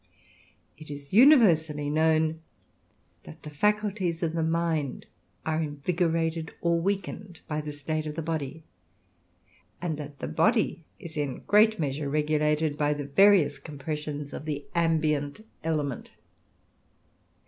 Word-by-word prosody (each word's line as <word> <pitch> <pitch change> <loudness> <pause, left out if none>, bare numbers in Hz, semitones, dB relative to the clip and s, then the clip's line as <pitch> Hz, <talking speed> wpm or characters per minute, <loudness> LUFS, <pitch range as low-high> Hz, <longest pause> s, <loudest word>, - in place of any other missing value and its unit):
It 155 - -10
is 140 +1 -9
universally 175 - +5
known 160 +1 +2 0.8
that 75 - -13
the 150 - -8
faculties 195 0 0
of 165 -1 0
the 165 - -1
mind 160 -3 -1 0.4
are 160 0 0
invigorated 165 +1 -1
or 170 0 +1
weakened 195 -1 -3
by 155 0 -2
the 150 0 -6
state 155 +2 -3
of 150 - -5
the 165 - -3
body, 160 -1 -4 1.2
and 160 -4 -3
that 145 -1 -8
the - - -5
body 215 -7 +1
is 160 -2 -10
in 145 -3 -1
a - - -11
great 215 +1 +4
measure 145 -2 -2
regulated 150 0 +1
by 150 0 +2
the 145 -1 -5
various 150 -2 +4
compressions 150 0 -5
of - - -6
the 145 -2 -4
ambient 155 +1 0 0.2
element. 150 -5 -2
155 Hz, 130 wpm, -27 LUFS, 145-170 Hz, 1.2 s, universally